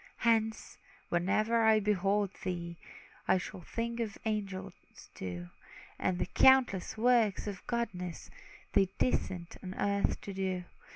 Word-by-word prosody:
Hence, 220 -1 +1 0.3
whenever 215 +6 +2
I 220 -1 +6
behold 200 -1 +1
thee, 170 -2 -3 0.5
I - - +5
shall 185 0 -6
think 235 +6 -3
of 220 -3 -3
angels 195 -3 -2 0.4
too; 90 -1 -6 0.5
And 185 -1 +1
the - - 0
countless 255 -8 +4
works 230 -3 +3
of 200 -3 -6
goodness 185 -8 -3 0.4
They 195 - +4
descend 180 -8 -1
on 185 0 -6
earth 200 0 +1
to 200 - -6
do. 190 -1 -2
200 Hz, 125 wpm, -32 LUFS, 185-220 Hz, 0.5 s, I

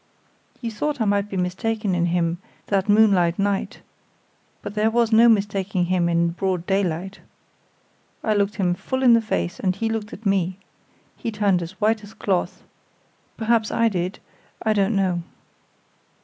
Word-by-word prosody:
"You 230 -2 -3
thought 290 +7 -2
I 220 - +1
might 200 0 +1
be 195 - -4
mistaken 195 +3 -1
in 175 -1 +1
him 170 0 0 0.3
that 195 0 0
moonlight 195 -5 +4
night, 200 0 -2 0.8
but 205 - -6
there 215 +1 +2
was 230 0 +1
no 230 +2 +7
mistaking 195 -4 +1
him 175 -1 +1
in 170 0 +2
broad 180 0 -2
daylight. 190 -1 -1 1.0
I 215 - +1
looked 205 0 0
him 180 -4 +1
full 260 +8 -3
in 245 -2 +7
the 230 - +5
face, 85 - -2
and 185 -1 0
he 225 +1 -2
looked 220 -1 -3
at 215 - -11
me. 190 -2 +1 0.6
He - - -4
turned 205 -4 +1
as 175 +3 -8
white 215 +1 +1
as 205 +1 -13
cloth. 190 -3 -2 0.7
Perhaps 225 -1 +1
I 230 0 +2
did 185 0 -3 0.5
I 220 - +2
don't 205 +1 +1
know." 185 -3 +1
200 Hz, 165 wpm, -23 LUFS, 180-220 Hz, 1.0 s, no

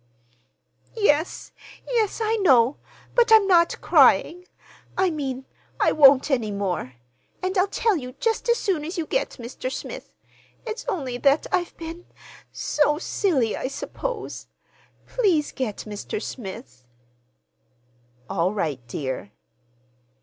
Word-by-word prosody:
"Yes, 325 -6 +1 0.4
yes, 455 -4 0
I 440 +1 +1
know, 265 - +4 0.4
but 475 -1 +3
I'm 440 -2 +8
not 345 -3 +3
crying—I 360 +1 +2
mean, 265 -4 -4 0.3
I - - +4
won't 280 -1 +6
any 240 -5 +1
more. 185 -10 -3 0.5
And 370 +1 -1
I'll 370 +1 +3
tell 440 +1 +1
you 255 -5 -5
just 455 - -1
as 475 - +4
soon 365 -10 -1
as 340 +5 -5
you 330 - -1
get - - -2
Mr. 245 +2 -5
Smith. - - -7 0.5
It's 445 0 -6
only 260 -8 -3
that 280 +3 +3
I've 360 -2 -1
been—so 320 -3 -3
silly, 300 - 0
I - - -3
suppose. 435 - -5 0.6
Please 365 -11 +1
get 245 -7 -4
Mr. 210 0 -5
Smith." 190 - -8 1.4
"All 185 0 0
right, 155 -9 -1
dear." 130 -6 -4
300 Hz, 120 wpm, -24 LUFS, 235-380 Hz, 1.4 s, I'm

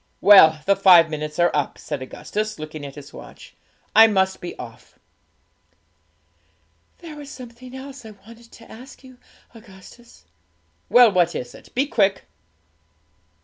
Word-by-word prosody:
Well, 160 -7 +6
the 200 - +3
five 180 -4 +5
minutes 150 0 -6
are 175 0 +2
up,' 145 -2 -2
said 145 -3 -7
Augustus, 215 +10 -6
looking 155 -1 -8
at 135 - -13
his 145 -1 -13
watch; - - -14 0.4
'I 225 +1 +8
must 190 -3 -1
be 175 - -8
off.' - - -13 2.0
'There 330 -3 -12
was 290 -1 -11
something 250 0 -12
else 270 0 -11
I 220 - -11
wanted 230 +3 -17
to 230 - -16
ask 255 +5 -14
you, 255 -1 -17 0.3
Augustus.' 225 - -18 0.6
'Well, 245 -2 +6
what 175 -2 +1
is 125 -1 -7
it? - - -16
Be 265 +3 +1
quick!' 200 -7 0
205 Hz, 145 wpm, -21 LUFS, 165-240 Hz, 2.0 s, I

